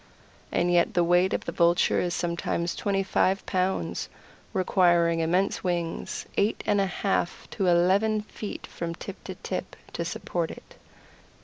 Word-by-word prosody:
And 175 0 +2
yet 175 -1 +3
the 175 - +4
weight 175 +2 +3
of - - -2
the - - -3
Vulture 170 0 +3
is 175 -1 -1
sometimes 170 0 -1
twenty 195 -1 0
five 190 0 +1
pounds, 185 0 -1 0.4
requiring 175 -4 +3
immense 180 +4 +1
wings 175 -2 -2
eight 205 +2 +1
and 205 -1 +3
a 195 - +1
half 190 -1 -1
to 195 -3 -1
eleven 195 +5 +3
feet 210 0 -7
from 170 -1 -5
tip 195 +3 -9
to - - -6
tip - - -5 0.2
to - - -2
support - - -3
it. - - -11
180 Hz, 150 wpm, -27 LUFS, 170-195 Hz, 0.4 s, the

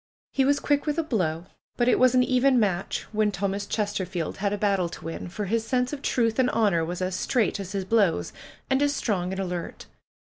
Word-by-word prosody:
He 270 - +2
was 285 +1 +3
quick 290 -1 +1
wdth 300 0 -1
a 330 - +1
blow; 180 - -1 0.3
but 240 - +2
it - - +4
was 255 0 +5
an 250 - +5
even 255 0 +3
match 195 -4 -1
when 215 -1 +1
Thomas 200 +1 -2
Chesterfield 190 -5 -2
had 200 0 -1
a 205 - -1
battle 195 -4 +1
to 170 - -10
win, 165 +1 -5
for 205 +4 -4
his 225 +3 0
sense 250 +3 0
of 285 - -5
truth 230 -3 +1
and 255 -1 +4
honor 200 -7 +2
was 175 +2 -3
as 185 0 -2
straight 225 0 0
as 195 0 -6
his 195 -2 -2
blows, 200 -5 +1 0.3
and 265 +1 +1
as 290 0 +2
strong 185 -8 -1
and 190 - -4
alert. 180 -3 -4
210 Hz, 220 wpm, -26 LUFS, 185-250 Hz, 0.3 s, was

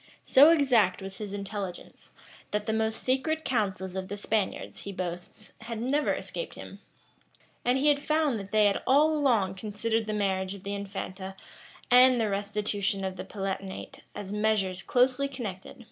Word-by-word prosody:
So 285 +4 +7
exact 255 - +4
was 195 -1 -8
his 210 -2 -5
intelligence, 200 -2 -6 0.4
that 210 0 -2
the 220 - 0
most 220 0 -1
secret 315 +5 0
counsels 190 -6 -1
of 190 0 -3
the 205 - -5
Spaniards, 210 0 -2
he 200 - -6
boasts, 180 +3 -6
had 225 0 -5
never 280 +5 +1
escaped - - -6
him;[] - - -10 0.8
and 250 +2 +3
he 290 +2 +4
found 300 -4 +1
that 200 0 -9
they 215 -1 +4
had 200 -1 +2
all 300 +4 +5
along 235 -10 +2
considered 215 +3 -2
the 215 - -1
marriage 190 -2 -1
of 195 - -12
the 200 - -3
infanta 195 -1 -5 0.6
and 250 0 +7
the 220 -2 +1
restitution 200 -1 -1
of 190 0 -3
the - - -6
Palatinate 195 -1 -5 0.2
as 205 -1 -6
measures 210 -3 +1
closely 255 +2 +2
connected, 260 -3 -6
or - - 0
altogether 185 - -14
inseparable. 270 - -14
210 Hz, 175 wpm, -28 LUFS, 195-250 Hz, 0.8 s, So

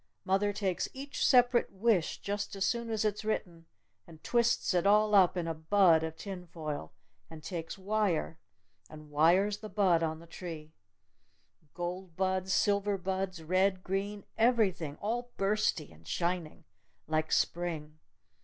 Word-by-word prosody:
Mother 195 +2 +2
takes 195 -3 -2
each 275 +2 -4
separate 245 -2 +4
wish 195 -3 +1
just 205 0 -3
as 195 0 0
soon 235 -1 -1
as 220 -1 -1
it's 210 0 -1
written, 175 -6 -3 0.4
and 160 -2 -15
twists 235 -3 +2
it 180 +1 +2
all 210 +1 +4
up 185 -2 +5
in 170 -2 -2
a 165 - -1
bud 165 +1 +4
of 160 0 -4
tin 185 -2 -7
foil! 155 - -6 0.4
And 160 -1 -11
takes 170 -1 -5
wire! 195 -5 -1 0.5
And 155 -1 -12
wires 180 +7 +3
the 215 - -8
bud 185 -6 +3
on 160 -1 -1
the 165 - -13
tree! 160 -3 -8 1.0
Gold 175 0 -5
buds! 190 0 0
Silver 200 +1 +2
buds! 185 -2 -3
Red! 185 +2 +1
Green! 200 +2 -3
Everything! 205 - +2
All 240 +6 -3
bursty! 195 -6 0
And 80 +1 -19
shining! 175 -1 -2 0.4
Like 155 0 -1
Spring! 155 -3 -1
185 Hz, 145 wpm, -31 LUFS, 165-205 Hz, 1.0 s, up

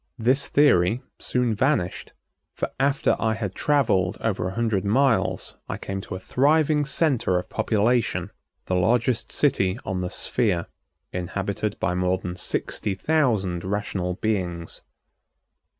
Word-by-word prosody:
This 130 +4 +2
theory 120 -5 +3 0.2
soon 125 -2 0
vanished, 110 -5 0 0.4
for - - -3
after 140 +1 +2
I 110 0 +1
had 105 -4 -4
traveled 110 -10 +1
over 95 -5 -1
a 95 - -5
hundred 110 -5 0
miles 125 +4 +1
I - - -3
came 95 0 -5
to 95 - -7
a - - -5
thriving 150 +6 +2
center 135 - +1
of 90 0 -5
population, 115 +2 +1 0.3
the - - -2
largest 115 +6 +1
city 95 -9 +2
on 95 -2 -2
the 90 - -2
sphere, 100 -7 0 0.5
inhabited 100 +3 -3
by 90 - 0
more 90 0 +1
than 90 -1 -6
sixty 95 +2 -2
thousand 105 - +1
rational 95 -2 -2
beings. 90 -6 -2
105 Hz, 135 wpm, -24 LUFS, 90-125 Hz, 0.5 s, theory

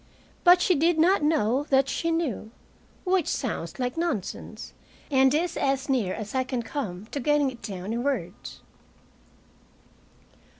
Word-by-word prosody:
But 355 0 +7
she 365 - +4
did 330 +2 +2
not 355 +4 +4
know 290 -3 +2
that 270 0 +4
she 335 +4 -1
knew 320 -10 -1 0.5
which 370 -3 +1
sounds 225 - -3
like 250 +2 -2
nonsense 325 - -4 0.4
and 265 -1 +5
is 335 +4 0
as 270 +1 0
near 220 -9 +1
as 215 -1 -6
I 260 -1 +1
can 255 -2 -3
come 215 -7 -5
to 285 - -3
getting 290 0 +2
it 240 -2 -13
down 195 0 -5
in 235 - -1
words. 225 -10 -4
270 Hz, 145 wpm, -26 LUFS, 230-315 Hz, 0.5 s, But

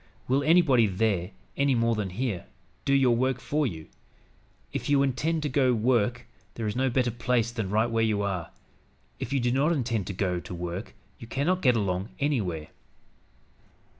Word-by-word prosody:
Will 135 +3 +2
anybody 140 -8 +5
there, 95 -2 0 0.3
any 140 -1 +2
more 115 0 +2
than 105 -3 -2
here, 100 - -3 0.4
do 140 - +2
your 130 -3 +4
work 130 +1 0
for 150 +2 0
you? 80 -7 -7 0.9
If - - -3
you 140 -1 +4
intend 150 +5 0
to - - 0
go 130 0 +2
to 125 - +3
work, 120 +1 +1 0.3
there 115 - -4
is 105 - -2
no 130 +1 +1
better 125 -1 +1
place 120 0 0
than 110 -5 -3
right 110 +3 +2
where 115 -1 0
you 105 -2 +1
are; 90 -4 -2 0.7
if - - -5
you 140 - +2
do 120 0 +1
not 140 +6 +2
intend 115 - -1
to 100 - -3
go 90 -2 -1
to 90 - -8
work, 90 +4 -5 0.2
you 115 - -9
cannot 150 +10 0
get 125 -6 +4
along 95 -1 -1
anywhere. 95 - -1
120 Hz, 185 wpm, -27 LUFS, 100-135 Hz, 0.9 s, anybody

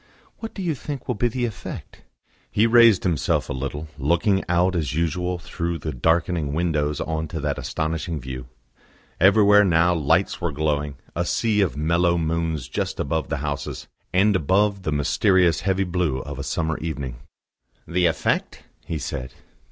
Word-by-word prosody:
"What 225 - -7
do 195 - -4
you 170 -3 0
think 140 -1 -6
will - - +1
be 120 +4 +1
the 120 +1 -1
effect?" 105 -6 -7 0.5
He 105 - +3
raised 115 -4 +6
himself 85 -6 0
a - - -1
little, 70 +4 -4
looking 85 +7 +2
out 90 +2 +2
as 75 -3 -1
usual 90 +2 -1
through 85 -1 -4
the 75 0 -4
darkening 80 +2 0
windows 75 -3 0
on 80 0 -2
to 80 +1 -5
that 75 -1 -2
astonishing 80 +1 -3
view. 65 -1 -7 0.7
Everywhere 105 +2 +6
now 85 -2 +3
lights 80 +4 +1
were 85 -2 -1
glowing, 75 -1 -1 0.2
a 85 - 0
sea 105 +3 +1
of 90 -7 0
mellow 85 +3 +2
moons 80 -4 -1
just 65 - -3
above 80 +3 -1
the 80 - -1
houses, 70 -1 -4 0.2
and 100 +3 +3
above 100 +4 +2
the 80 - -2
mysterious 85 +3 +3
heavy 95 +1 +1
blue 90 -6 -1
of 70 -2 -7
a - - -3
summer 80 +1 -2
evening. 70 -6 -4 0.7
"The 90 0 +2
effect?" 80 - -1 0.2
he 80 - -4
said. 65 -3 -5
85 Hz, 165 wpm, -23 LUFS, 75-95 Hz, 0.7 s, raised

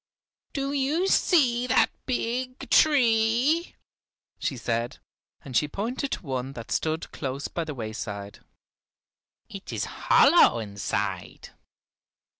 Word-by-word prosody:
"Do 275 -2 -2
you 290 +7 +1
see 250 -11 +3
that 255 - +3 0.2
big 255 0 -3
tree?" 255 +3 +3 0.6
she 135 - -2
said, 115 0 -2 0.5
and 130 -3 -8
she 150 - +3
pointed 240 - -3
to - - -6
one 130 -1 -3
that 115 -4 -9
stood 160 0 -1
close 135 0 -4
by 170 - -4
the 150 -2 -6
wayside. 105 -3 -6 1.1
"It - - -9
is - - -2
hollow - - +5
inside. 100 -3 -4
215 Hz, 110 wpm, -26 LUFS, -, 1.1 s, hollow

